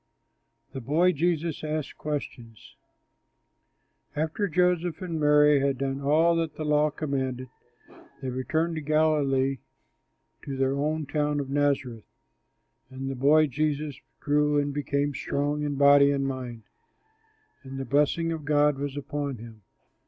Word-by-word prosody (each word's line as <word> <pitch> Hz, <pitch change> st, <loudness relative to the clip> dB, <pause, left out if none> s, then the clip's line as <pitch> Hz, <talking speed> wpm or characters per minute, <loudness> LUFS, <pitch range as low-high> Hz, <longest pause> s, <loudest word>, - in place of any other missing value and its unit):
THE 135 Hz, -, -5 dB
BOY 160 Hz, +9 st, +3 dB
JESUS 165 Hz, -1 st, -1 dB
ASKS 155 Hz, -1 st, -3 dB
QUESTIONS 120 Hz, -7 st, -7 dB, 1.4 s
After 160 Hz, +7 st, -1 dB
Joseph 180 Hz, -1 st, +1 dB
and 170 Hz, -4 st, -4 dB
Mary 150 Hz, -1 st, +5 dB
had 135 Hz, -1 st, 0 dB
done 135 Hz, +1 st, -3 dB
all 160 Hz, +4 st, +3 dB
that 165 Hz, -2 st, -2 dB
the 155 Hz, -, -5 dB
law 150 Hz, 0 st, +3 dB
commanded, 130 Hz, -4 st, -3 dB, 0.7 s
they 135 Hz, -2 st, -4 dB
returned 160 Hz, +6 st, -1 dB
to -, -, -3 dB
Galilee 145 Hz, -3 st, +1 dB, 0.8 s
to 135 Hz, -1 st, -5 dB
their 135 Hz, 0 st, +1 dB
own 150 Hz, +2 st, -1 dB
town 150 Hz, 0 st, -1 dB
of 135 Hz, -1 st, -5 dB
Nazareth. 140 Hz, -6 st, -1 dB, 0.8 s
And 135 Hz, 0 st, -5 dB
the -, -, -5 dB
boy 150 Hz, +4 st, +4 dB
Jesus 150 Hz, +1 st, -2 dB, 0.2 s
grew 150 Hz, 0 st, +1 dB
and 145 Hz, 0 st, 0 dB
became 145 Hz, 0 st, -1 dB
strong 145 Hz, +2 st, -2 dB
in 145 Hz, -1 st, -2 dB
body 140 Hz, 0 st, +6 dB
and 140 Hz, -1 st, 0 dB
mind. 125 Hz, -4 st, -5 dB, 1.0 s
And 135 Hz, -1 st, -9 dB
the 135 Hz, -, -4 dB
blessing 150 Hz, +5 st, +1 dB
of 160 Hz, -2 st, -4 dB
God 145 Hz, -1 st, +2 dB
was 140 Hz, 0 st, -4 dB
upon 145 Hz, -2 st, -4 dB
him. 110 Hz, -1 st, -12 dB
145 Hz, 135 wpm, -26 LUFS, 135-155 Hz, 1.4 s, body